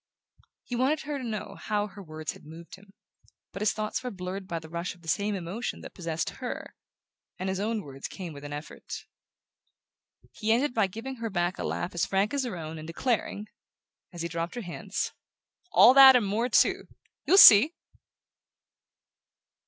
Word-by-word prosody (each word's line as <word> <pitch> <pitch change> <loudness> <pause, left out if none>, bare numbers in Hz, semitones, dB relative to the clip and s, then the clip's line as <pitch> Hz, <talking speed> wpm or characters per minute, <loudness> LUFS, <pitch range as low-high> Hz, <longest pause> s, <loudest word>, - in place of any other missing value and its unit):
He 245 - -5
wanted 265 +5 +1
her 290 0 -4
to - - -7
know 220 -3 -5
how 210 -1 -1
her 205 0 -11
words 155 -3 -6
had - - -15
moved 165 +2 -12
him; 195 +1 -14 0.6
but 195 - -8
his 210 - +3
thoughts 215 +2 -3
were 250 - -3
blurred 185 -1 -6
by 170 -3 -3
the 160 -1 -8
rush 170 +2 -4
of 175 - -23
the - - -14
same 205 +5 0
emotion 190 +6 -5
that - - -10
possessed 165 -3 -3
her, 250 - -5 0.6
and 185 - -4
his 190 0 -2
own 215 0 -2
words 135 -1 -8
came 180 -5 -8
with 140 0 -11
an 145 - -7
effort. 145 +1 -8 1.3
He 215 +1 -2
ended 245 +4 +2
by 220 -4 +2
giving 230 +7 -7
her 230 -1 -4
back 175 -2 -1
a - - -3
laugh 175 - -3
as 175 - 0
frank 195 +5 0
as 280 -2 0
her 215 -7 -4
own, 160 -1 -7
and 155 - -9
declaring, 210 +3 -2 0.7
as 175 -2 -6
he - - -1
dropped 170 +4 -4
her 240 - -4
hands: 175 -5 -4 0.6
"All 250 - +8
that 270 -1 +10
and 240 -4 +3
more 220 +5 0
too - - +3 0.4
you'll 385 - +5
see!" 285 - +9
195 Hz, 185 wpm, -28 LUFS, 170-230 Hz, 1.3 s, that